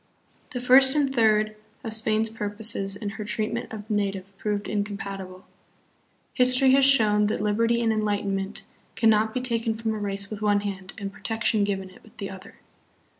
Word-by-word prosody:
The 250 Hz, -, -5 dB
first 265 Hz, +2 st, +6 dB
and 280 Hz, -3 st, +1 dB
third 215 Hz, -3 st, +2 dB, 0.3 s
of 225 Hz, -, -3 dB
Spain's 220 Hz, 0 st, +1 dB
purposes 205 Hz, -2 st, -1 dB
in 205 Hz, 0 st, -5 dB
her 210 Hz, +1 st, -6 dB
treatment 220 Hz, +2 st, -3 dB
of 215 Hz, -1 st, -8 dB
the 215 Hz, -, -2 dB
native 195 Hz, -1 st, -2 dB
proved 205 Hz, -1 st, -2 dB
incompatible. 195 Hz, -3 st, -5 dB, 0.9 s
History 255 Hz, +1 st, +4 dB
has 270 Hz, +1 st, +5 dB
shown 215 Hz, -6 st, +4 dB
that 210 Hz, -, -1 dB
liberty 230 Hz, +3 st, +1 dB
and 225 Hz, -1 st, +2 dB
enlightenment 205 Hz, -2 st, -2 dB, 0.3 s
can 225 Hz, -1 st, +4 dB
not 220 Hz, +1 st, +2 dB
be 255 Hz, -, -3 dB
taken 230 Hz, -2 st, -1 dB
from 225 Hz, 0 st, -2 dB
a 215 Hz, -, -4 dB
race 200 Hz, 0 st, -4 dB
with 215 Hz, -1 st, -6 dB
one 205 Hz, -1 st, +2 dB
hand 195 Hz, -2 st, -6 dB
and 200 Hz, -2 st, -6 dB
protection 225 Hz, -1 st, 0 dB
given 195 Hz, -2 st, -3 dB
it -, -, -18 dB
with 220 Hz, -, -21 dB
the 200 Hz, -, -5 dB
other. 190 Hz, 0 st, -12 dB
215 Hz, 175 wpm, -25 LUFS, 200-225 Hz, 0.9 s, first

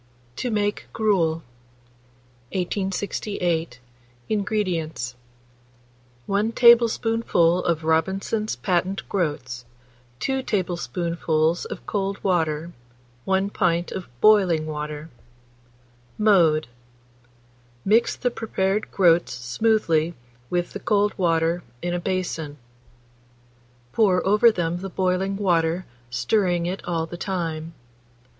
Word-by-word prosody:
TO 250 Hz, -, -2 dB
MAKE 205 Hz, -2 st, -1 dB
GRUEL. 170 Hz, -7 st, +1 dB, 1.1 s
1868. 180 Hz, -, -2 dB, 0.5 s
INGREDIENTS. 185 Hz, -, -1 dB, 1.1 s
1 205 Hz, +3 st, +1 dB
tablespoonful 225 Hz, -7 st, +4 dB
of 165 Hz, -2 st, 0 dB
Robinson's 190 Hz, +7 st, 0 dB
patent 185 Hz, +1 st, -1 dB
groats, 145 Hz, -9 st, -2 dB, 0.6 s
2 265 Hz, 0 st, 0 dB
tablespoonfuls 170 Hz, -5 st, -1 dB
of -, -, -7 dB
cold 195 Hz, -1 st, -2 dB
water, 165 Hz, -3 st, 0 dB, 0.5 s
1 190 Hz, +1 st, +1 dB
pint 175 Hz, -4 st, 0 dB
of 190 Hz, -, -5 dB
boiling 185 Hz, -7 st, +5 dB
water. 150 Hz, 0 st, -5 dB, 1.1 s
Mode. 170 Hz, -8 st, +4 dB, 1.2 s
Mix 220 Hz, +4 st, +3 dB
the 245 Hz, -, -1 dB
prepared 210 Hz, -3 st, -1 dB
groats 175 Hz, -3 st, +3 dB
smoothly 165 Hz, -, +1 dB, 0.3 s
with 175 Hz, 0 st, -1 dB
the -, -, -5 dB
cold 205 Hz, -1 st, +2 dB
water 165 Hz, -1 st, +1 dB, 0.2 s
in 175 Hz, 0 st, -1 dB
a 175 Hz, -, -1 dB
basin; 170 Hz, -5 st, -3 dB, 1.4 s
pour 190 Hz, -5 st, +3 dB
over 210 Hz, +4 st, +5 dB
them 175 Hz, -4 st, -1 dB
the 195 Hz, +1 st, -5 dB
boiling 185 Hz, +1 st, 0 dB
water, 175 Hz, -2 st, +1 dB, 0.2 s
stirring 175 Hz, -, +1 dB
it 185 Hz, +3 st, -3 dB
all 165 Hz, -2 st, -1 dB
the 170 Hz, +1 st, -8 dB
time. 165 Hz, -4 st, -3 dB
180 Hz, 95 wpm, -24 LUFS, 165-205 Hz, 1.4 s, boiling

